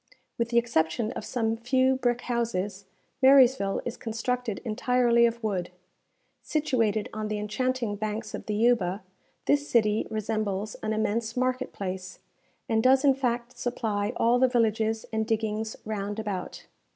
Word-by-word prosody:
With 235 Hz, 0 st, 0 dB
the 235 Hz, -, +1 dB
exception 220 Hz, -2 st, +1 dB
of -, -, -6 dB
some 225 Hz, -3 st, -1 dB
few 260 Hz, +3 st, +2 dB
brick 245 Hz, -1 st, 0 dB
houses, 205 Hz, -5 st, -2 dB, 0.4 s
Marysville 260 Hz, -7 st, +5 dB
is 240 Hz, -, -4 dB
constructed 235 Hz, 0 st, -2 dB
entirely 235 Hz, +1 st, +3 dB
of 235 Hz, 0 st, -5 dB
wood. 185 Hz, -5 st, -1 dB, 0.7 s
Situated 230 Hz, -9 st, 0 dB
on 215 Hz, 0 st, -3 dB
the 210 Hz, 0 st, -2 dB
enchanting 230 Hz, +1 st, -1 dB
banks 215 Hz, +1 st, -4 dB
of -, -, -6 dB
the 210 Hz, -, -1 dB
Yuba, 210 Hz, -5 st, +2 dB, 0.4 s
this 285 Hz, 0 st, +2 dB
city 215 Hz, -2 st, +2 dB
resembles 215 Hz, -1 st, -2 dB
an 215 Hz, -, -2 dB
immense 220 Hz, +2 st, -1 dB
market 255 Hz, 0 st, 0 dB
place, 185 Hz, -1 st, -5 dB, 0.5 s
and 220 Hz, -1 st, +2 dB
does 260 Hz, +3 st, +4 dB
in 275 Hz, -, +6 dB
fact 245 Hz, -2 st, -2 dB
supply 220 Hz, -4 st, -1 dB
all 235 Hz, +2 st, +3 dB
the 260 Hz, -, +5 dB
villages 225 Hz, -2 st, +1 dB
and 220 Hz, 0 st, 0 dB
diggings 220 Hz, -1 st, -1 dB
round 205 Hz, -1 st, -3 dB
about. 205 Hz, -4 st, -5 dB
225 Hz, 145 wpm, -27 LUFS, 210-245 Hz, 0.7 s, in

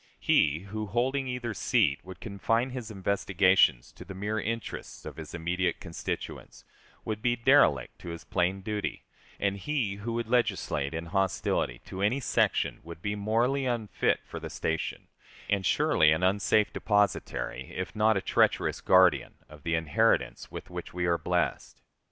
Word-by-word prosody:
He, 75 Hz, +3 st, +3 dB
who, 105 Hz, +2 st, -5 dB
holding 130 Hz, +5 st, 0 dB
either 125 Hz, -2 st, -3 dB
seat, 70 Hz, -7 st, +2 dB
would 95 Hz, 0 st, -10 dB
confine 115 Hz, +5 st, -1 dB
his 125 Hz, -3 st, -6 dB
investigations 95 Hz, -, +2 dB
to -, -, -12 dB
the 95 Hz, -, -9 dB
mere 105 Hz, +3 st, -2 dB
interests 115 Hz, +2 st, -5 dB
of -, -, -8 dB
his 80 Hz, +1 st, -7 dB
immediate 90 Hz, +2 st, -1 dB
constituents, -, -, -6 dB, 0.4 s
would 110 Hz, -1 st, -3 dB
be 120 Hz, 0 st, +2 dB
derelict 120 Hz, -, +3 dB
to -, -, -8 dB
his 85 Hz, 0 st, -7 dB
plain 90 Hz, +2 st, 0 dB
duty; 105 Hz, +1 st, -3 dB, 0.4 s
and 100 Hz, 0 st, 0 dB
he 110 Hz, -3 st, -2 dB
who 115 Hz, +3 st, -4 dB
would 115 Hz, -1 st, -2 dB
legislate 105 Hz, -, 0 dB
in 80 Hz, +1 st, -4 dB
hostility 95 Hz, -9 st, 0 dB
to 95 Hz, -, -6 dB
any 110 Hz, +7 st, +2 dB
section 135 Hz, -, +1 dB
would 85 Hz, 0 st, -10 dB
be 105 Hz, -, -1 dB
morally 120 Hz, +6 st, +1 dB
unfit 115 Hz, -4 st, 0 dB
for -, -, -7 dB
the -, -, -7 dB
station, 80 Hz, 0 st, -3 dB, 0.4 s
and 100 Hz, -3 st, +1 dB
surely 75 Hz, -1 st, +4 dB
an 80 Hz, +3 st, +1 dB
unsafe 100 Hz, +2 st, +2 dB
depositary, 105 Hz, -, 0 dB
if 95 Hz, +3 st, -5 dB
not 110 Hz, 0 st, +3 dB
a -, -, -1 dB
treacherous -, -, +1 dB
guardian, 95 Hz, -2 st, +4 dB
of 75 Hz, -1 st, -14 dB
the 80 Hz, +2 st, 0 dB
inheritance 80 Hz, -2 st, +1 dB
with -, -, -9 dB
which -, -, -7 dB
we 90 Hz, -1 st, 0 dB
are 85 Hz, -1 st, +2 dB
blessed. -, -, -1 dB
100 Hz, 160 wpm, -29 LUFS, 85-115 Hz, 0.4 s, surely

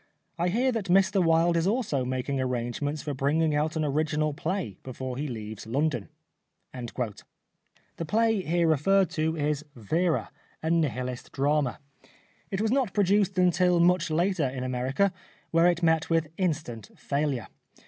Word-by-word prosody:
I 175 Hz, -, +2 dB
hear 245 Hz, +8 st, +2 dB
that 225 Hz, -5 st, -2 dB
Mr 190 Hz, +1 st, +4 dB
Wilde 165 Hz, +1 st, +3 dB
is 165 Hz, +1 st, +1 dB
also 205 Hz, -, 0 dB
making 130 Hz, +2 st, -2 dB
arrangements 130 Hz, +4 st, -2 dB
for 150 Hz, -2 st, -3 dB
bringing 150 Hz, +4 st, +1 dB
out 155 Hz, +3 st, 0 dB
an 155 Hz, -1 st, 0 dB
original 150 Hz, +1 st, 0 dB
play 165 Hz, -, -3 dB
before 130 Hz, 0 st, -6 dB
he 145 Hz, +4 st, -3 dB
leaves 110 Hz, -4 st, -7 dB
London." 130 Hz, -3 st, -1 dB, 0.6 s
The 125 Hz, +6 st, -8 dB
play 225 Hz, +2 st, +2 dB
here 170 Hz, 0 st, +1 dB
referred 185 Hz, +5 st, +3 dB
to 160 Hz, +1 st, -1 dB
is 150 Hz, 0 st, -1 dB
" -, -, -37 dB
Vera," 160 Hz, -, 0 dB, 0.3 s
a 160 Hz, -, 0 dB
Nihilist 125 Hz, -6 st, -1 dB
drama. 145 Hz, -1 st, +1 dB, 0.7 s
It 195 Hz, +1 st, -2 dB
was 220 Hz, 0 st, +1 dB
not 255 Hz, -6 st, +1 dB
produced 200 Hz, -1 st, +2 dB
until 180 Hz, -1 st, +3 dB
much 175 Hz, 0 st, +3 dB
later 165 Hz, -2 st, +1 dB
in 130 Hz, 0 st, -5 dB
America, 130 Hz, +10 st, 0 dB, 0.4 s
where 165 Hz, +1 st, +5 dB
it 175 Hz, 0 st, +1 dB
met 160 Hz, -1 st, +2 dB
with 165 Hz, -2 st, +1 dB
instant 155 Hz, -, -2 dB
failure. 140 Hz, -4 st, -1 dB
155 Hz, 150 wpm, -27 LUFS, 130-180 Hz, 0.7 s, where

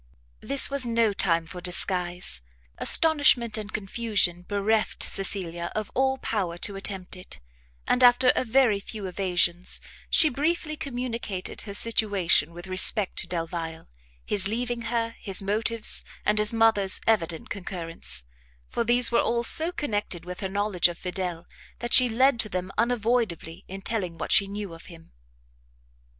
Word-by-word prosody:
This 275 Hz, 0 st, +4 dB
was 280 Hz, -1 st, +5 dB
no 230 Hz, -3 st, +1 dB
time 170 Hz, -4 st, +1 dB
for 180 Hz, +2 st, -10 dB
disguise; 180 Hz, -, 0 dB, 0.4 s
astonishment 285 Hz, -8 st, +5 dB
and 215 Hz, -1 st, -7 dB
confusion 205 Hz, -4 st, 0 dB
bereft 210 Hz, +2 st, -1 dB
Cecilia 175 Hz, -3 st, -4 dB
of 215 Hz, -1 st, -4 dB
all 265 Hz, +1 st, 0 dB
power 190 Hz, -9 st, -3 dB
to 200 Hz, +3 st, -3 dB
attempt 195 Hz, -2 st, -4 dB
it; 180 Hz, -, -11 dB, 0.5 s
and, 250 Hz, -, +1 dB
after 250 Hz, +1 st, +5 dB
a -, -, 0 dB
very 240 Hz, -4 st, +2 dB
few 205 Hz, 0 st, -7 dB
evasions, 180 Hz, -1 st, 0 dB, 0.3 s
she 320 Hz, -, +5 dB
briefly 310 Hz, +3 st, -2 dB
communicated 240 Hz, -8 st, -5 dB
her 200 Hz, -2 st, -8 dB
situation 200 Hz, -8 st, +2 dB
with 175 Hz, +1 st, -11 dB
respect 190 Hz, +2 st, +3 dB
to -, -, -3 dB
Delvile, 165 Hz, -2 st, -6 dB, 0.4 s
his 195 Hz, -2 st, 0 dB
leaving 240 Hz, +2 st, -3 dB
her, 230 Hz, -1 st, -2 dB
his 195 Hz, -1 st, 0 dB
motives, 220 Hz, +3 st, -1 dB, 0.2 s
and 210 Hz, 0 st, +1 dB
his 210 Hz, 0 st, +4 dB
mother's 225 Hz, -4 st, +2 dB
evident 170 Hz, -7 st, -1 dB
concurrence; 165 Hz, -, -3 dB, 0.5 s
for -, -, -2 dB
these 240 Hz, 0 st, +4 dB
were 235 Hz, -, +3 dB
all 235 Hz, 0 st, -1 dB
so 320 Hz, +7 st, +5 dB
connected 205 Hz, -, -4 dB
with 180 Hz, 0 st, -8 dB
her 190 Hz, -, -4 dB
knowledge 200 Hz, -2 st, +1 dB
of 175 Hz, -1 st, -7 dB
Fidel, 180 Hz, -2 st, -5 dB, 0.3 s
that 240 Hz, 0 st, -4 dB
she 250 Hz, -1 st, +7 dB
led 260 Hz, +2 st, +2 dB
to 215 Hz, -, -1 dB
them 185 Hz, 0 st, -5 dB
unavoidably 225 Hz, -7 st, -2 dB
in 195 Hz, +1 st, -9 dB
telling 185 Hz, -7 st, -3 dB
what -, -, -5 dB
she 200 Hz, -, +5 dB
knew 200 Hz, -2 st, -7 dB
of 165 Hz, -, -13 dB
him. 165 Hz, -2 st, -14 dB
205 Hz, 150 wpm, -25 LUFS, 180-235 Hz, 0.5 s, she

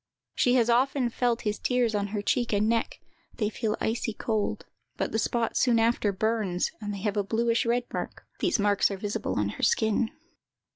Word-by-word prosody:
_ -, -, -63 dB, 0.3 s
She 250 Hz, 0 st, +3 dB
has 235 Hz, -3 st, +4 dB
often 250 Hz, +1 st, +2 dB
felt 240 Hz, 0 st, 0 dB
his 210 Hz, -1 st, -2 dB
tears 250 Hz, -3 st, +1 dB
on 205 Hz, -1 st, 0 dB
her 205 Hz, 0 st, -3 dB
cheek 240 Hz, +2 st, +1 dB
and 205 Hz, +1 st, +2 dB
neck; 230 Hz, 0 st, 0 dB, 0.4 s
they 210 Hz, -1 st, 0 dB
felt 220 Hz, -1 st, -2 dB
icy 225 Hz, 0 st, -1 dB
cold; 215 Hz, -1 st, -2 dB, 0.3 s
but -, -, -1 dB
the 220 Hz, -, 0 dB
spot 230 Hz, +1 st, 0 dB
soon 245 Hz, -2 st, +3 dB
after 225 Hz, -2 st, +2 dB
burns, 205 Hz, -3 st, 0 dB
and 205 Hz, -1 st, -3 dB
they 200 Hz, -2 st, -5 dB
have 210 Hz, 0 st, -1 dB
a 205 Hz, -, +2 dB
bluish 230 Hz, +3 st, +1 dB
red 240 Hz, +1 st, +2 dB
mark. -, -, -5 dB
(These 350 Hz, -, +2 dB
marks 205 Hz, -2 st, +3 dB
are 200 Hz, -, -4 dB
visible 205 Hz, -, -2 dB
on 105 Hz, -1 st, 0 dB
her -, -, -7 dB
skin.) 220 Hz, +1 st, +2 dB
220 Hz, 200 wpm, -27 LUFS, 205-235 Hz, 0.4 s, has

